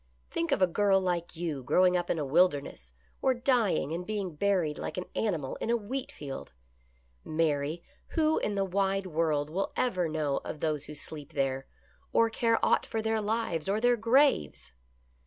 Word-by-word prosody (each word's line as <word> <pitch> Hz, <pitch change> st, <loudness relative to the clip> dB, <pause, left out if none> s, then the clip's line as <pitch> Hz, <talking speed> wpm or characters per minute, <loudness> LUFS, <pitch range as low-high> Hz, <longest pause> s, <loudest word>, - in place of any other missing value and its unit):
Think 170 Hz, -, -1 dB
of 190 Hz, -, +3 dB
a 180 Hz, -2 st, +2 dB
girl 200 Hz, -2 st, +4 dB
like 175 Hz, -2 st, -2 dB
you 160 Hz, -5 st, -3 dB
growing 180 Hz, +8 st, +3 dB
up 175 Hz, -, -1 dB
in -, -, +1 dB
a 150 Hz, -, -1 dB
wilderness, 140 Hz, -, +1 dB, 0.3 s
or 260 Hz, -, +3 dB
dying 240 Hz, -, +1 dB
and 175 Hz, +2 st, -3 dB
being 200 Hz, -3 st, -3 dB
buried 175 Hz, -3 st, 0 dB
like -, -, -5 dB
an 180 Hz, -, -3 dB
animal 165 Hz, -11 st, -1 dB
in -, -, -4 dB
a 235 Hz, -, +3 dB
wheat 245 Hz, +5 st, -5 dB
field! 135 Hz, -, -8 dB, 0.7 s
Mary, 155 Hz, 0 st, 0 dB, 0.3 s
who 315 Hz, 0 st, +3 dB
in 205 Hz, -, -2 dB
the 195 Hz, -1 st, +1 dB
wide 195 Hz, +1 st, 0 dB
world 155 Hz, -3 st, 0 dB
will 195 Hz, +4 st, -1 dB
ever 185 Hz, -9 st, +1 dB
know 150 Hz, -3 st, 0 dB
of 150 Hz, -, -6 dB
those 150 Hz, -2 st, -1 dB
who 150 Hz, -, -9 dB
sleep 150 Hz, -1 st, -6 dB
there, 135 Hz, -1 st, -1 dB, 0.5 s
or 230 Hz, 0 st, +4 dB
care 230 Hz, 0 st, +2 dB
aught -, -, +2 dB
for 220 Hz, -1 st, -2 dB
their 220 Hz, 0 st, +1 dB
lives 210 Hz, -6 st, -1 dB
or 205 Hz, +2 st, +1 dB
their 245 Hz, +1 st, +4 dB
graves 230 Hz, -, +2 dB
180 Hz, 180 wpm, -29 LUFS, 150-215 Hz, 0.7 s, girl